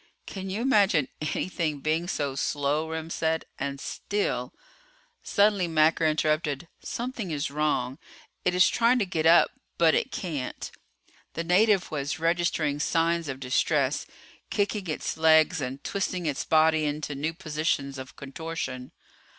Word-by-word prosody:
"Can 190 Hz, -1 st, -6 dB
you 200 Hz, +4 st, -2 dB
imagine 200 Hz, -, +3 dB
anything 155 Hz, 0 st, -2 dB
being 160 Hz, +4 st, 0 dB
so 145 Hz, -6 st, -2 dB
slow," 145 Hz, +3 st, -1 dB
Remm 160 Hz, 0 st, -5 dB
said, 160 Hz, -1 st, 0 dB
"and 140 Hz, 0 st, -3 dB
still 205 Hz, +8 st, -2 dB, 0.4 s
..." -, -, -35 dB
Suddenly 200 Hz, -3 st, +3 dB
Macker 160 Hz, 0 st, +3 dB
interrupted. 155 Hz, 0 st, 0 dB
"Something 240 Hz, -5 st, -4 dB
is 145 Hz, -3 st, -2 dB
wrong. 145 Hz, -3 st, -1 dB, 0.4 s
It 180 Hz, -, +1 dB
is 180 Hz, +1 st, +6 dB
trying 235 Hz, +2 st, +3 dB
to 220 Hz, -, +1 dB
get 165 Hz, -4 st, 0 dB
up, 170 Hz, +1 st, +6 dB, 0.3 s
but 165 Hz, -2 st, +5 dB
it -, -, 0 dB
can't." 150 Hz, -9 st, -4 dB, 0.6 s
The 165 Hz, -, -3 dB
native 190 Hz, +2 st, +3 dB
was 145 Hz, +1 st, -2 dB
registering 165 Hz, -3 st, 0 dB
signs 165 Hz, +1 st, +1 dB
of 135 Hz, 0 st, -5 dB
distress, 135 Hz, +2 st, +1 dB, 0.4 s
kicking 205 Hz, -2 st, -1 dB
its 155 Hz, -, -3 dB
legs 160 Hz, +1 st, +4 dB
and 135 Hz, +1 st, -5 dB
twisting 185 Hz, -3 st, -2 dB
its 145 Hz, -4 st, -2 dB
body 160 Hz, 0 st, +4 dB
into 150 Hz, 0 st, -2 dB
new 155 Hz, +4 st, -3 dB
positions 150 Hz, -5 st, -2 dB
of 130 Hz, -1 st, -9 dB
contortion. 140 Hz, -3 st, -6 dB
160 Hz, 140 wpm, -27 LUFS, 145-180 Hz, 0.6 s, is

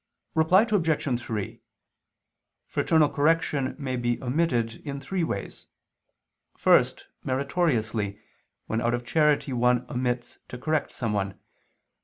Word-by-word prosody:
Reply 160 Hz, +6 st, +5 dB
Obj. 160 Hz, -, +1 dB
3: 105 Hz, -4 st, -5 dB, 1.0 s
Fraternal 160 Hz, -2 st, +3 dB
correction 150 Hz, -3 st, +1 dB
may 135 Hz, -3 st, -3 dB
be 120 Hz, 0 st, 0 dB
omitted 125 Hz, -4 st, 0 dB
in 140 Hz, -2 st, -5 dB
three 180 Hz, +6 st, -2 dB
ways. 100 Hz, -11 st, -4 dB, 0.9 s
First, -, -, +3 dB, 0.2 s
meritoriously, 120 Hz, -, 0 dB, 0.5 s
when 110 Hz, +1 st, -1 dB
out 120 Hz, 0 st, +1 dB
of 120 Hz, 0 st, -6 dB
charity 150 Hz, -2 st, +2 dB
one 125 Hz, 0 st, +2 dB
omits 125 Hz, -1 st, -2 dB
to 125 Hz, -, -7 dB
correct 155 Hz, +4 st, -1 dB
someone. 100 Hz, -4 st, -2 dB
130 Hz, 110 wpm, -26 LUFS, 120-155 Hz, 1.0 s, Reply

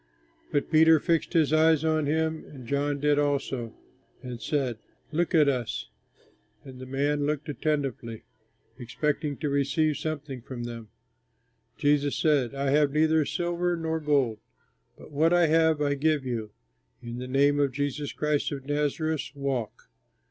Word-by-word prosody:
But 145 Hz, -, -1 dB
Peter 160 Hz, 0 st, +6 dB
fixed 165 Hz, +2 st, 0 dB
his 155 Hz, -3 st, +3 dB
eyes 160 Hz, 0 st, +4 dB
on 155 Hz, -2 st, +1 dB
him, 160 Hz, +1 st, 0 dB
and 130 Hz, -4 st, -12 dB
John 140 Hz, +3 st, -1 dB
did 145 Hz, 0 st, +2 dB
also, 135 Hz, -5 st, -1 dB, 0.5 s
and 125 Hz, -2 st, -7 dB
said, 125 Hz, -2 st, -1 dB, 0.3 s
"Look 170 Hz, +2 st, 0 dB
at 150 Hz, -3 st, +5 dB
us." 125 Hz, -5 st, -2 dB, 0.7 s
And 130 Hz, -2 st, -11 dB
the 130 Hz, -, -8 dB
man 145 Hz, +2 st, 0 dB
looked 150 Hz, +1 st, -2 dB
attentively, 140 Hz, -7 st, -2 dB, 0.6 s
expecting 145 Hz, +4 st, -2 dB
to 150 Hz, -, -3 dB
receive 140 Hz, +2 st, +1 dB
something 145 Hz, -4 st, -5 dB
from 120 Hz, -1 st, -7 dB
them. 115 Hz, -2 st, -7 dB, 0.9 s
Peter 145 Hz, 0 st, +2 dB
said, 140 Hz, -4 st, +1 dB
"I 135 Hz, 0 st, 0 dB
have 145 Hz, 0 st, +3 dB
neither 155 Hz, 0 st, +3 dB
silver 175 Hz, +1 st, -1 dB
nor 160 Hz, 0 st, -2 dB
gold, 140 Hz, -7 st, +1 dB, 0.6 s
but -, -, -14 dB
what 160 Hz, +4 st, +3 dB
I 175 Hz, -1 st, +5 dB
have 160 Hz, -1 st, +3 dB
I 145 Hz, -1 st, +1 dB
give 145 Hz, 0 st, +1 dB
you. 115 Hz, -4 st, -3 dB, 0.5 s
In 120 Hz, +1 st, -6 dB
the 125 Hz, -, -5 dB
name 140 Hz, +2 st, +3 dB
of 140 Hz, -2 st, +2 dB
Jesus 145 Hz, +2 st, -3 dB
Christ 150 Hz, -1 st, -1 dB
of 135 Hz, -2 st, -6 dB
Nazareth, 150 Hz, +2 st, -1 dB
walk!" 135 Hz, -5 st, -3 dB
145 Hz, 150 wpm, -27 LUFS, 135-155 Hz, 0.9 s, Peter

